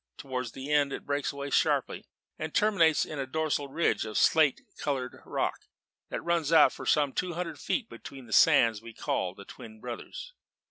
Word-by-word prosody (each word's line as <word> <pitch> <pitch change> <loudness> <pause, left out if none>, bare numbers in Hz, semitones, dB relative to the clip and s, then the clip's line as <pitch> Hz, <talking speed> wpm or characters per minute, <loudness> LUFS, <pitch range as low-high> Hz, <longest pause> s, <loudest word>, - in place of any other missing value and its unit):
Towards 130 -3 -5
its 135 +1 -6
end 145 -1 +2
it - - -6
breaks 145 0 -1
away 140 0 -6
sharply, - - +1 0.3
and 155 0 -5
terminates 180 -8 +3
in 150 - -6
a 135 - -3
dorsal 150 0 -1
ridge 165 +5 0
of 110 -1 -4
slate 155 -4 +4 0.2
coloured 130 -4 -3
rock - - -2 0.4
that - - -4
runs 170 -3 0
out 160 -3 +6
for - - -8
some 145 -3 +2
two 180 -1 -2
hundred 175 -1 -4
feet 245 -6 -2
between 135 - -11
the 110 - -7
sands 110 -2 +5
we 115 -1 -11
call 90 -1 -2
the 100 - -12
Twin 110 +1 -12
Brothers. 125 - -8
140 Hz, 185 wpm, -29 LUFS, 125-160 Hz, 0.4 s, out